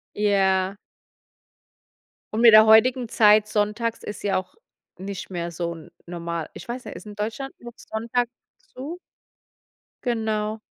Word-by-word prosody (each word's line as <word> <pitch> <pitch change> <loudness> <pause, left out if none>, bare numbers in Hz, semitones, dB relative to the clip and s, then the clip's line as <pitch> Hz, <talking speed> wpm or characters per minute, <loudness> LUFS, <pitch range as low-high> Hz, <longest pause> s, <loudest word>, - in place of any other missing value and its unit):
Ja. 195 -2 +2 1.6
Und 225 - 0
mit 230 -2 +8
der 215 0 +9
heutigen 245 +3 +5
Zeit 210 -1 +5
sonntags 215 +2 -1
ist 210 - -7
ja 200 -2 +1
auch 185 - -6 0.4
nicht 195 0 -6
mehr 170 -2 -4
so 170 0 -3
n 160 - -13
normal. 170 -2 -5
Ich - - -10
weiß 245 +1 -5
nicht, - - -8
ist - - -10
in 210 -1 -9
Deutschland 225 +6 -4
noch 240 -1 -10
sonntags 235 +2 -2 0.4
zu? 295 +7 -7 1.1
Genau. 220 -2 -1
215 Hz, 140 wpm, -24 LUFS, 190-230 Hz, 1.6 s, der